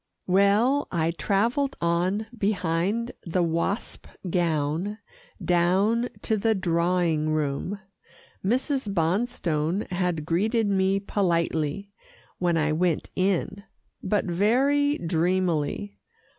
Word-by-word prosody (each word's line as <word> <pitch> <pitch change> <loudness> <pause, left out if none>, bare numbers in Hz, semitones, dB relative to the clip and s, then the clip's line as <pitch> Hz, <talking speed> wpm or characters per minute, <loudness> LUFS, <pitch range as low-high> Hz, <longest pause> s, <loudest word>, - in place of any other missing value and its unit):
Well, 205 +9 +3
I 165 -1 +1
travelled 225 - 0
on 175 +5 0
behind 200 +2 0
the 175 +1 0
wasp 170 +6 -2 0.2
gown 165 +3 0 0.5
down 190 +8 +2
to 220 - +1
the 220 +2 +2
drawing 170 -3 +1
room. 155 +6 -2 0.6
Mrs. 255 +2 0
Bonstone 175 -1 0
had 175 -4 -1
greeted 215 +7 +1
me 195 0 +2
politely, 175 -1 -1 0.5
when 175 -2 +1
I 155 -1 +1
went 170 0 0
in, 195 +1 0 0.4
but 205 +2 0
very 265 - +2
dreamily. 175 +2 -1
185 Hz, 95 wpm, -26 LUFS, 170-210 Hz, 0.6 s, Well